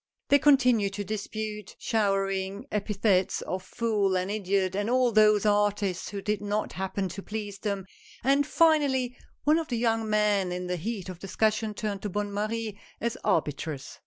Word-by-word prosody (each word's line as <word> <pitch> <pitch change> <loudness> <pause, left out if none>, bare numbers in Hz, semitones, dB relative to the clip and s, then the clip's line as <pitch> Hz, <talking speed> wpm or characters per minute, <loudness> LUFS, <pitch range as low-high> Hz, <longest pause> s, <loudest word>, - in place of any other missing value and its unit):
They 285 - +6
continued 250 -8 +4
to 205 - -3
dispute, 210 0 -5
showering 195 0 0
epithets 200 -2 +1
of 185 - -3
fool 205 -3 0
and 185 +2 -2
idiot 195 -2 0
on 205 +2 -1
all 250 -1 +3
those 215 -1 +5
artists 205 -3 +1
who 200 -1 -6
did 210 -1 -1
not 205 +1 -2
happen 190 +1 -2
to 195 - -6
please 205 -1 -5
them, 200 -3 -2 0.4
and 275 +2 +3
finally 285 -7 +3 0.3
one 305 +2 +4
of 325 - -4
the 240 - -2
young 225 -1 +1
men 210 -3 +2
in 180 0 -3
the 180 0 -2
heat 200 +2 -4
of 185 -2 -7
discussion 215 +2 0
turned 205 -2 -3
to 210 - -3
Bonne 205 +1 -3
Marie 215 0 -3 0.2
as 235 0 -1
arbitress. 150 -2 -1
210 Hz, 165 wpm, -28 LUFS, 195-225 Hz, 0.4 s, They